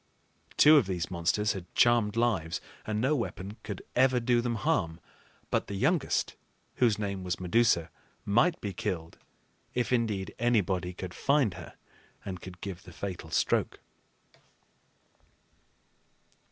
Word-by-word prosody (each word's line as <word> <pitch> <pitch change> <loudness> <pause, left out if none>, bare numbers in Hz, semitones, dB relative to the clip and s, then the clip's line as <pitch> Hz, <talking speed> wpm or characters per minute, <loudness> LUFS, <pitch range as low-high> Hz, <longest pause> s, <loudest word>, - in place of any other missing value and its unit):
Two 150 +1 +8
of 125 -9 +3
these 90 -2 -3
monsters 95 +5 +1
had 90 -4 -8
charmed 115 -3 +4
lives, 110 -9 0 0.3
and 105 -1 -1
no 135 +6 +2
weapon 105 -5 -4
could 105 -4 -6
ever 130 0 +4
do 120 0 +2
them 120 -1 -1
harm; 85 -5 0 0.5
but - - 0
the 100 - -5
youngest, 160 - +1 0.4
whose 115 -4 +3
name 100 -3 -3
was 90 0 -2
Medusa, 90 -3 +2 0.3
might 140 - +3
be 100 -2 -4
killed, 85 -2 -4 0.6
if 125 0 0
indeed 110 -6 0
anybody 100 -6 +1
could 90 0 -7
find 140 -8 +2
her - - -10 0.5
and 90 -2 -5
could 90 -1 -10
give 95 -3 -6
the - - -13
fatal 90 -5 -6
stroke. - - +1
100 Hz, 135 wpm, -29 LUFS, 90-120 Hz, 0.6 s, Two